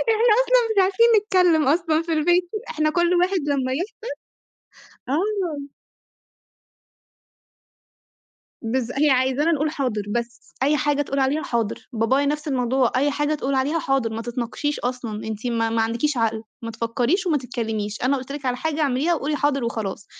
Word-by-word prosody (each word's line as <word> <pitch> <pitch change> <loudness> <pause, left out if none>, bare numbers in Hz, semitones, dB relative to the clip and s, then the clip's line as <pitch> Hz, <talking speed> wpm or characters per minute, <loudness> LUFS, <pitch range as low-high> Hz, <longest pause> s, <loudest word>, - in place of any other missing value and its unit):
إحنا 450 0 +4
أصلًا - - +3
مش 390 - +5
عارفين 390 +5 +3 0.2
نتكلّم 360 -8 +3
أصلًا 320 +1 +2
في 330 -1 -3
البيت 350 +3 +2 0.2
إحنا 310 0 +1
كلّ 345 +2 +2
واحد 365 +1 +2
لمّا 265 -2 0
يفصل 400 - -5 1.1
آه. 325 -4 -2 2.9
بالض 240 +1 -1
هي 300 0 +4
عايزانا 265 +5 +2
نقول 305 0 0
حاضر 250 -8 -2
بس، 235 0 -5
أي 295 +2 +3
حاجة 290 +1 +1
تقول 275 0 -3
عليها 275 +4 +1
حاضر، 230 -3 -3
بابايا 255 +5 +1
نفْس 300 +1 -2
الموضوع، 255 -1 +1
أي 285 +2 +2
حاجة 295 +2 0
تقول 275 -2 -2
عليها 280 +5 +1
حاضر، 270 -6 0
ما 225 +1 -4
تتناقشيش 245 +5 -3
أصلًا، 240 -4 -4
أنتِ 220 +2 -5
ما 225 -1 0
ما 225 0 +1
عندكيش 235 +5 0
عقل، 225 -1 0 0.2
ما 230 - -4
تفكّريش 240 - -1
وما 305 -4 +2
تتكلّميش، 220 -4 -4
أنا 270 +2 +2
قُلت 260 +1 -6
لِك 285 -2 -7
على 250 0 0
حاجة 320 +2 -2
اعمليها 290 +4 +1
وقولي 300 0 -2
حاضر 275 -4 0
وخلاص، 215 -4 -4
275 Hz, 160 wpm, -23 LUFS, 240-315 Hz, 2.9 s, مش